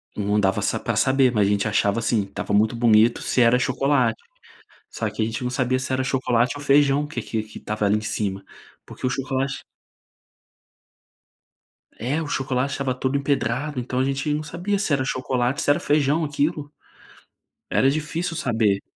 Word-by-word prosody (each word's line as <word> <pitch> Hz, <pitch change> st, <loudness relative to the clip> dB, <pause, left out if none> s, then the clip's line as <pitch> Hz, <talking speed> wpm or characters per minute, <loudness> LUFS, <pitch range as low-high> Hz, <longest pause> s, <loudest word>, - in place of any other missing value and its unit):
Não 105 Hz, 0 st, 0 dB
dava 95 Hz, -1 st, +1 dB
sa -, -, 0 dB
para -, -, -2 dB
saber, 130 Hz, -1 st, +3 dB
mas 105 Hz, -2 st, +3 dB
a -, -, +1 dB
gente 105 Hz, +1 st, +1 dB
achava, 105 Hz, 0 st, +1 dB
assim, 115 Hz, -2 st, +1 dB
estava 100 Hz, +1 st, -5 dB
muito 110 Hz, +3 st, +3 dB
bonito, 115 Hz, 0 st, +4 dB
se 125 Hz, -, +1 dB
era 115 Hz, +1 st, +5 dB
chocolate. 135 Hz, -, +1 dB, 0.7 s
Só 110 Hz, -, -3 dB
que 105 Hz, +1 st, -4 dB
a -, -, +3 dB
gente 110 Hz, +2 st, -4 dB
não 125 Hz, -, -2 dB
sabia 130 Hz, 0 st, 0 dB
se 130 Hz, -, -4 dB
era 130 Hz, 0 st, 0 dB
chocolate 125 Hz, -1 st, +1 dB
ou 145 Hz, -, -8 dB
feijão 140 Hz, +1 st, +3 dB
que 150 Hz, -, -5 dB
que 110 Hz, -1 st, -3 dB
que 110 Hz, 0 st, -11 dB
estava 105 Hz, -1 st, -2 dB
ali 105 Hz, +1 st, +3 dB
em -, -, -2 dB
cima, 100 Hz, -2 st, -3 dB, 0.4 s
porque -, -, -6 dB
o 125 Hz, -, 0 dB
chocolate 135 Hz, 0 st, -2 dB, 2.3 s
É, 135 Hz, +8 st, -2 dB
o 155 Hz, -, -4 dB
chocolate 130 Hz, 0 st, -1 dB
estava 135 Hz, -2 st, -2 dB
todo 130 Hz, +2 st, -1 dB
empedrado, 140 Hz, 0 st, -1 dB
então 125 Hz, +1 st, -3 dB
a -, -, +3 dB
gente 135 Hz, +2 st, -1 dB
não 150 Hz, -, -1 dB
sabia 175 Hz, +7 st, -2 dB
se 195 Hz, -, -1 dB
era 135 Hz, -, +1 dB
chocolate, 130 Hz, 0 st, -1 dB
se -, -, -1 dB
era 145 Hz, -, +4 dB
feijão, 150 Hz, +2 st, +1 dB
aquilo. 145 Hz, 0 st, -2 dB, 1.0 s
Era 135 Hz, -, +3 dB
difícil 160 Hz, +4 st, -2 dB
saber. 110 Hz, -7 st, +1 dB
130 Hz, 185 wpm, -23 LUFS, 110-140 Hz, 2.3 s, era